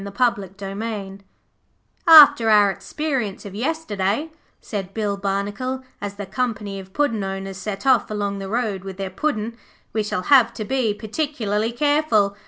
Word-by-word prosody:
Third 240 +4 +2 0.2
Slice 200 -1 -5 0.9
'After 290 -7 +9
our 205 -2 +6
experience 250 - -3
of 200 - -8
yesterday,' 245 0 -2 0.3
said 195 -3 -6
Bill 210 -2 -1
Barnacle 205 +7 -3 0.2
as 205 0 -5
the 205 0 -6
company 210 -2 -3
of 190 0 -11
Puddin' 230 -5 0
owners 195 0 -5
set 200 +3 -5
off 260 -5 +4
along 205 -2 -2
the 195 0 -6
road 215 -4 -1
with 190 -1 -8
their 195 -1 -4
Puddin', 230 -1 -2 0.4
'we 220 - +1
shall 205 -3 -2
have 245 -3 +5
to 215 - -4
be 245 -4 0
particularly 220 -2 -2
careful. 240 -7 +2
210 Hz, 150 wpm, -22 LUFS, 195-250 Hz, 0.9 s, After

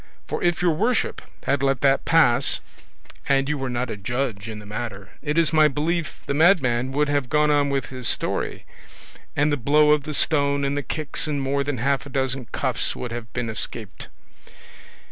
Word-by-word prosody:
for - - -3
if 175 0 +1
your 175 - +4
worship 225 +9 0 0.2
had 140 0 0
let 135 -2 +1
that 135 -1 +3
pass 160 -8 +4 0.7
and 135 0 +3
you 150 - 0
were 135 -2 -3
not 125 0 -2
a - - -3
judge 115 0 -3
in 110 - -6
the 105 - -10
matter 105 -2 -6
it 150 +2 -2
is 165 -1 +3
my 155 -1 +6
belief 155 +3 -2
the - - -2
madman 135 -7 +3
would 145 +2 +1
have 145 -3 0
gone 150 +1 +3
on 145 -1 +2
with 140 -1 -1
his 130 -2 -4
story, - - -2 0.7
and 145 +1 +2
the 145 - +1
blow 150 +4 +4
of 150 -1 +4
the 150 +2 -6
stone, 140 -2 +2
and 140 +1 -1
the 145 - -1
kicks, 150 0 -2
and 145 -2 -1
more 140 +1 0
than 140 -1 -3
half 135 +3 0
a - - -9
dozen 135 -2 -1
cuffs - - -1
would 125 - -5
have 115 -1 -6
been 125 -2 -3
escaped." 110 - -2
140 Hz, 200 wpm, -23 LUFS, 125-150 Hz, 0.7 s, my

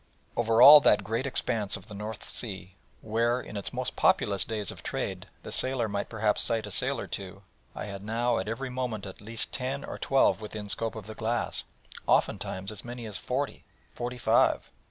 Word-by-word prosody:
Over 115 0 +4
all 150 +2 +12
that 105 -7 +4
great 115 +6 -2
expanse 115 -6 +1
of 100 - -14
the 105 - -10
North 105 +1 -6
Sea, 95 -5 -3 0.3
where, 115 +3 +1
in 110 - -9
its 100 - -2
most - - -3
populous 100 -2 +3
days 105 -3 -3
of - - -11
trade, - - -4 0.2
the - - -8
sailor 130 -3 +3
might 100 -1 -3
perhaps 105 -2 +1
sight 115 -2 +1
a 105 - -6
sail - - +2
or - - -4
two, 95 0 -7 0.3
I - - -5
had 100 -2 -7
now 115 +3 0
at 95 - -4
every 125 +4 -4
moment 125 -5 -3
at 95 0 -10
least 110 +2 -2
ten 135 +2 -3
or - - -7
twelve 135 -4 +3
within 105 -1 -7
scope 115 +2 +1
of 110 -3 -7
the 110 - -8
glass, 115 +2 -2 0.4
oftentimes 95 +2 0
as 105 - -2
many 120 -1 -7
as 105 -4 -5
forty, 135 +3 -3 0.3
forty 125 +1 -5
five. - - +2
110 Hz, 195 wpm, -28 LUFS, 105-120 Hz, 0.4 s, all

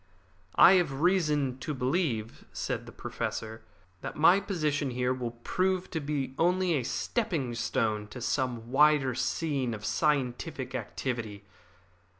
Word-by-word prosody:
"I 180 - +8
have 140 -4 -4
reason 150 -8 +2
to 150 +2 -4
believe," 130 - -1
said - - -3
the - - -9
Professor, 110 0 -5 0.4
"that - - -6
my 175 +5 +6
position 155 -8 -1
here 125 0 0
will 120 -2 -5
prove 185 0 0
to 160 - -1
be 140 -3 -3
only 180 +1 +2
a 145 - +1
stepping 165 - -1
stone 110 -3 -1
to 125 - -9
some 120 -2 -2
wider 145 -2 +4
scene 130 -1 -1
of 105 0 -8
scientific 135 -2 -1
activity. 110 -6 -4
135 Hz, 135 wpm, -29 LUFS, 120-160 Hz, 0.4 s, I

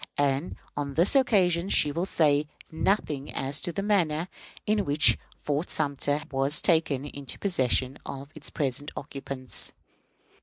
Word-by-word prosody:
And 145 +3 0 0.2
on 140 -1 -4
this 175 - +4
occasion 190 -9 +3
she 150 - +4
will 170 +5 -2
say 150 -4 +2 0.2
nothing 160 -4 -1
as 135 +2 -2
to 175 - -3
the 195 +3 -3
manner 175 -5 +1 0.4
in 210 -1 +2
which 145 -2 +5 0.2
Fort 150 +4 -2
Sumter 145 0 0
was 135 +2 +2
taken 160 -5 +2
into 140 -2 -6
the - - -18
possession 130 -7 +1
of 140 +1 -8
its 155 - -4
present 145 0 -2
occupants. 135 -2 -2
145 Hz, 145 wpm, -27 LUFS, 140-170 Hz, 0.4 s, which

